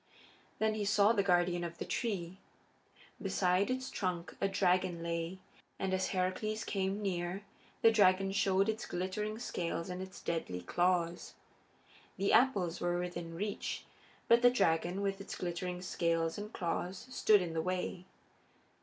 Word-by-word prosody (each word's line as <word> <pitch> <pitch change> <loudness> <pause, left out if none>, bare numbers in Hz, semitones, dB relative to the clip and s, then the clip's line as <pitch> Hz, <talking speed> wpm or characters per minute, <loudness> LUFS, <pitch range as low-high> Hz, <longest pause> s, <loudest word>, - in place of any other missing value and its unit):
Then 220 0 +2
he 215 -1 -2
saw 205 +2 +4
the 205 - +3
guardian 175 -2 +2
of 170 0 -5
the - - -4
tree. 190 -5 -2 0.8
Beside 185 +2 +2
its 260 +1 -2
trunk 180 -3 -3
a 195 - +3
dragon 185 -3 +1
lay, 170 +2 -2 0.4
and 190 -1 -1
as 190 0 +1
Heracles 195 +4 -1
came 195 +1 -1
near 180 0 -2 0.4
the 225 - +8
dragon 195 -3 +4
showed 195 0 +2
its 220 +1 -2
glittering 200 +4 -2
scales 170 -6 -3
and 180 +1 -4
its 190 0 -8
deadly 125 - -3
claws. 175 - 0 0.8
The 195 +1 +1
apples 205 -8 +3
were 175 0 +1
within 175 -2 -4
reach, 205 +4 -3 0.4
but 235 +1 +6
the 245 - +8
dragon, 185 -4 +1
with 195 0 -1
its - - -6
glittering 180 0 -3
scales 165 -2 0
and 210 +1 -6
claws, 180 0 -3
stood 210 -6 +4
in 170 -2 -4
the 160 - 0
way. 180 +1 -3
185 Hz, 150 wpm, -33 LUFS, 175-200 Hz, 0.8 s, the